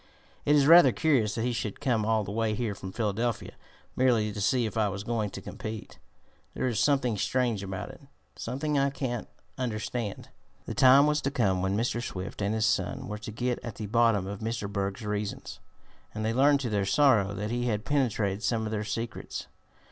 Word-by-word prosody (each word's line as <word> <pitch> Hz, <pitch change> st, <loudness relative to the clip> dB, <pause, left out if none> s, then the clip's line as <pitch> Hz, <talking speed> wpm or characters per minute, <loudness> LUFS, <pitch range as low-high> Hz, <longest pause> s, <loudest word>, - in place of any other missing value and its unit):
It 145 Hz, -, +4 dB
is 145 Hz, -2 st, +5 dB
rather 170 Hz, +3 st, +8 dB
curious 130 Hz, -10 st, +1 dB
that 115 Hz, -, -1 dB
he 125 Hz, 0 st, 0 dB
should 110 Hz, -3 st, -4 dB
come 120 Hz, -7 st, 0 dB
all 110 Hz, -1 st, +2 dB
the 100 Hz, -, -6 dB
way 110 Hz, 0 st, 0 dB
here 115 Hz, -2 st, -2 dB
from 95 Hz, -1 st, -8 dB
Philadelphia, 110 Hz, +2 st, -2 dB, 0.4 s
merely 115 Hz, -5 st, +2 dB
to 105 Hz, -, -5 dB
see 125 Hz, +3 st, +2 dB
if 110 Hz, -, -4 dB
I 110 Hz, -2 st, +2 dB
was 100 Hz, 0 st, -5 dB
going 110 Hz, -2 st, -1 dB
to -, -, -9 dB
compete. 110 Hz, 0 st, -7 dB, 0.6 s
There -, -, -1 dB
is 115 Hz, -5 st, 0 dB
something 125 Hz, -7 st, +2 dB
strange 120 Hz, -2 st, 0 dB
about 95 Hz, -1 st, -5 dB
it, -, -, -15 dB, 0.3 s
something 150 Hz, +4 st, -3 dB
that 140 Hz, -1 st, +3 dB
I -, -, 0 dB
can't 130 Hz, -4 st, -4 dB, 0.3 s
understand." 115 Hz, -2 st, -3 dB, 0.4 s
The -, -, -4 dB
time 130 Hz, +2 st, +7 dB
was 150 Hz, 0 st, +1 dB
to 135 Hz, -, 0 dB
come 100 Hz, -9 st, +1 dB
when 95 Hz, +2 st, 0 dB
Mr. 120 Hz, +1 st, 0 dB
Swift 95 Hz, -2 st, -6 dB
and 100 Hz, +2 st, 0 dB
his 110 Hz, -1 st, +1 dB
son -, -, 0 dB
were 105 Hz, +1 st, -5 dB
to 105 Hz, +1 st, -7 dB
get 125 Hz, +2 st, -2 dB
at 115 Hz, -3 st, -6 dB
the 110 Hz, -, -5 dB
bottom 115 Hz, -2 st, +3 dB
of 100 Hz, +1 st, -5 dB
Mr. 115 Hz, -2 st, -3 dB
Berg's 100 Hz, +2 st, -3 dB
reasons, 105 Hz, 0 st, -4 dB, 0.6 s
and 110 Hz, 0 st, -2 dB
they 110 Hz, -, 0 dB
learned 140 Hz, +3 st, +4 dB
to 125 Hz, -, -2 dB
their 100 Hz, -1 st, +1 dB
sorrow 105 Hz, -8 st, +4 dB
that 105 Hz, +2 st, -3 dB
he 120 Hz, +1 st, -1 dB
had 105 Hz, -1 st, -1 dB
penetrated 110 Hz, -8 st, 0 dB
some 115 Hz, -1 st, 0 dB
of 110 Hz, -, -3 dB
their 105 Hz, -1 st, -1 dB
secrets. 115 Hz, +2 st, -5 dB
110 Hz, 210 wpm, -28 LUFS, 105-125 Hz, 0.6 s, rather